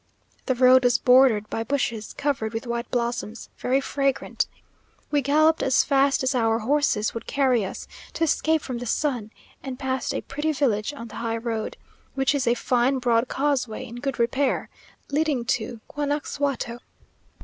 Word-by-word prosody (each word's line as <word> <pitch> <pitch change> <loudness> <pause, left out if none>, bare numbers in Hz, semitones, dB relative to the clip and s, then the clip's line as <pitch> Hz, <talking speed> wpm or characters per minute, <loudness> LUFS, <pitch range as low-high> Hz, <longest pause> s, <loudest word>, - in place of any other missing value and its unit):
The 260 - +2
road 255 +1 +6
was 245 -1 +4
bordered 250 -4 +5
by 225 - -1
bushes, 235 -5 -2
covered 265 -6 -2
with 225 +2 -4
white 235 0 -3
blossoms, 235 -2 -3
very 260 +2 +2
fragrant. 275 -1 -1 0.6
We 290 -1 +3
galloped 310 +4 +3
as 265 - +3
fast 275 -1 +2
as 260 - +1
our 225 -3 +2
horses 235 -3 +1
would 230 - -7
carry 260 -5 +2
us, 190 - -6 0.3
to 330 - -1
escape 320 0 +2
from 250 -3 -4
the 245 - -5
sun; 245 -4 -1 0.3
and 265 -2 -6
passed 265 -2 -2
a - - -1
pretty 310 +2 -2
village 240 -5 0
on 235 -6 -9
the - - -9
high 230 -1 -1
road, 225 -1 -3 0.4
which 270 +2 +2
is 275 -4 -1
a 235 - +4
fine 250 +2 +1
broad 240 -1 +2
causeway 270 -6 -1
in 235 - -9
good 275 +2 -3
repair, 260 +3 0 0.4
leading 290 -4 +1
to 230 -2 -2
Guanaxuato. 285 -4 -2
255 Hz, 165 wpm, -24 LUFS, 235-280 Hz, 0.6 s, road